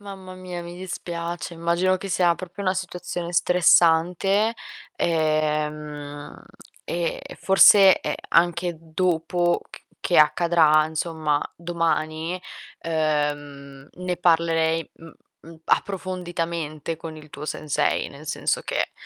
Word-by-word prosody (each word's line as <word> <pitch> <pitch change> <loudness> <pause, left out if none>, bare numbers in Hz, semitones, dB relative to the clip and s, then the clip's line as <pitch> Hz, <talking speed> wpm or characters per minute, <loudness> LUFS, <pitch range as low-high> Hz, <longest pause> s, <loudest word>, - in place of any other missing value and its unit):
Mamma 190 -2 -10
mia, 180 -1 -7
mi 175 +1 -9
dispiace. 175 -2 -5
Immagino 170 +3 +1
che 195 - -7
sia 175 -2 +3
proprio 185 +3 -8
una 185 -1 +1
situazione 180 -1 -5
stressante, 180 +4 +3 0.4
ehm, 150 -2 -2 0.5
e 170 0 -3 0.2
forse, 195 0 +7
ehm, - - -2
anche 175 0 +2
dopo 175 +1 0
c - - -13
che 175 - +2
accadrà, 155 -1 +4
insomma 155 -2 -1
domani, 165 0 -2 0.4
uhm, 145 -3 -2
ne 180 0 -4
parlerei, 165 -2 +2
mhmm, 165 -1 -14 0.3
mhmm, 165 0 -13
approfonditamente 170 -5 -2
con 160 0 -8
il 150 -1 -13
tuo 145 - -8
sensei, 150 -2 -1
nel 140 +2 -13
senso - - -1
che, - - -2
170 Hz, 110 wpm, -24 LUFS, 155-180 Hz, 0.5 s, forse